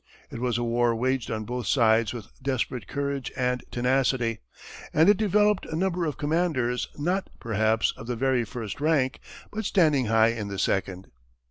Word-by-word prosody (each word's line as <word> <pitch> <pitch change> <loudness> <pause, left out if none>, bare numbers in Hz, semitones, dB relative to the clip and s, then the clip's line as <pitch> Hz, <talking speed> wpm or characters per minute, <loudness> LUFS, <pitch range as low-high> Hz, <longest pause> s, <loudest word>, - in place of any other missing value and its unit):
It - - -6
was 120 -1 0
a 120 - -1
war 120 0 +1
waged 130 +1 -1
on 110 0 -3
both 125 -1 -4
sides 115 -2 +3
with 120 -2 -8
desperate 130 -4 -2
courage 140 -1 -3
and 125 -1 0
tenacity, 125 -2 +1 0.6
and 160 +2 +5
it 205 - +7
developed 210 -1 +2
a 155 - -4
number 180 0 0
of 150 - -4
commanders 145 -6 0
not, 180 +6 -1
perhaps, 110 0 +1
of 115 - -10
the 125 - -2
very 130 0 +1
first 115 +2 -6
rank, 145 -4 +1 0.3
but 220 +1 -4
standing 155 - +3
high 110 0 +4
in 115 -3 -3
the 100 -1 -5
second. 95 -1 -1
125 Hz, 170 wpm, -26 LUFS, 115-150 Hz, 0.6 s, it